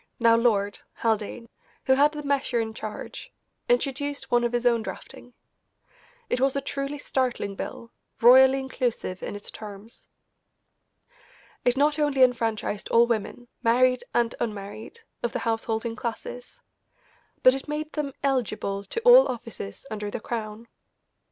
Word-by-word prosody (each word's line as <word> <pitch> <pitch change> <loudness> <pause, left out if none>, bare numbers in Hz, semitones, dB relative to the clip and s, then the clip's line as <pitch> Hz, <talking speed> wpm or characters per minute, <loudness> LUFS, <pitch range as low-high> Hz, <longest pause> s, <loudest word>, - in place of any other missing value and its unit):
(now 230 -1 +5
Lord) 205 -4 +1 0.2
Haldane, 225 +1 -1 0.4
who 265 - +5
had 285 +3 +4
the 300 -1 -6
measure 275 -4 0
in 220 -1 -2
charge, 215 -1 -7 0.4
introduced 285 - -1
one 240 0 +4
of 240 - +1
his 240 0 -1
own 235 -2 +4
drafting. 245 +2 -9 0.9
It 250 - -1
was 270 0 +2
a - - +2
truly 275 +1 -4
startling 255 -7 -1
bill, 230 +4 -7 0.3
royally 260 +3 +7
inclusive 245 -8 -3
in - - -5
its 205 - -9
terms. 210 +1 -11 1.5
It 245 +1 +2
not 295 +2 +2
only 290 -3 +3
enfranchised 225 -4 0
all 235 +1 +6
women, 235 +1 -3
married 250 +2 +3
and 235 -1 +1
unmarried, 215 - -6 0.2
of 240 - -2
the - - 0
householding 225 0 -1
classes, 245 +1 -6 0.8
but 255 - +8
it 270 +2 -4
made 305 +1 -4
them 290 -3 -3
eligible 215 -7 -1
to 460 - -4
all - - +8
offices 230 - -7
under 210 -1 -4
the - - -4
Crown. 220 0 -5
240 Hz, 140 wpm, -26 LUFS, 220-270 Hz, 1.5 s, but